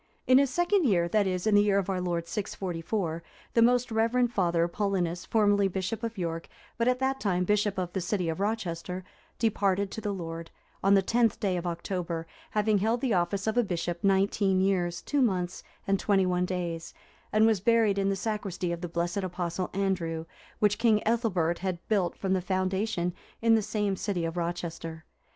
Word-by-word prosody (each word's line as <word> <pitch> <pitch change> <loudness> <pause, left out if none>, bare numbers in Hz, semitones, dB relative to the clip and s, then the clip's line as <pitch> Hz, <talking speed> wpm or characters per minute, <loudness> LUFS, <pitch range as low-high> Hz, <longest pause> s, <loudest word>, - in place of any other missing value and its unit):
In 255 +1 +6
his 280 -1 +3
second 350 +7 +2
year, 175 -8 +3
that 205 +1 +2
is, 185 0 -2
in 215 - +3
the 205 - +7
year 205 -1 +3
of 200 -1 0
our 190 -2 -1
Lord 170 -2 -2
644, 180 -3 -3 0.3
the 230 - +4
most 245 +1 +3
reverend 235 +2 +2
Father 170 -4 +2
Paulinus, 180 -2 -1
formerly 205 -2 +3
Bishop 190 +4 -3
of 230 -2 -4
York, 165 -2 -3 0.3
but 230 - +2
at 250 0 +3
that 265 +1 0
time 180 -3 +1
Bishop 205 +1 +1
of 180 -2 -3
the 190 - -1
city 180 0 -1
of 165 +2 -2
Rochester, 185 -4 -2 0.3
departed 200 -3 +1
to 220 - -5
the 205 - -2
Lord, 165 -3 -5 0.3
on 195 +1 +5
the 195 - +4
10th 230 +2 +2
day 195 -3 0
of 175 0 -3
October, 170 -1 -3 0.2
having 210 -1 +2
held 225 +4 +1
the 255 -5 +1
office 185 +2 0
of 220 +2 +1
a - - +4
bishop 175 -3 -3
nineteen 195 0 +2
years, 180 -3 0
two 290 -1 0
months, 185 -6 0 0.2
and 195 0 +1
twenty 195 -2 +2
one 180 0 +1
days; 170 -3 -4 0.4
and 215 +1 +4
was 220 -3 +3
buried 220 -1 +3
in 195 0 +1
the 195 - +1
sacristy 195 -4 -3
of 170 0 -4
the 175 - -4
blessed 170 +2 -2
Apostle 180 -1 -2
Andrew,(358) 175 -5 -1 0.3
which 210 0 +2
King 220 -3 +3
Ethelbert 190 -8 +1
had 185 -2 -4
built 195 -5 +1
from 190 -1 -1
the 190 - +1
foundation, 185 0 -1 0.3
in 230 0 +4
the 225 - +4
same 210 -1 -1
city 185 -3 -2
of 165 +1 -3
Rochester. 165 -2 -4
195 Hz, 195 wpm, -28 LUFS, 175-215 Hz, 0.4 s, the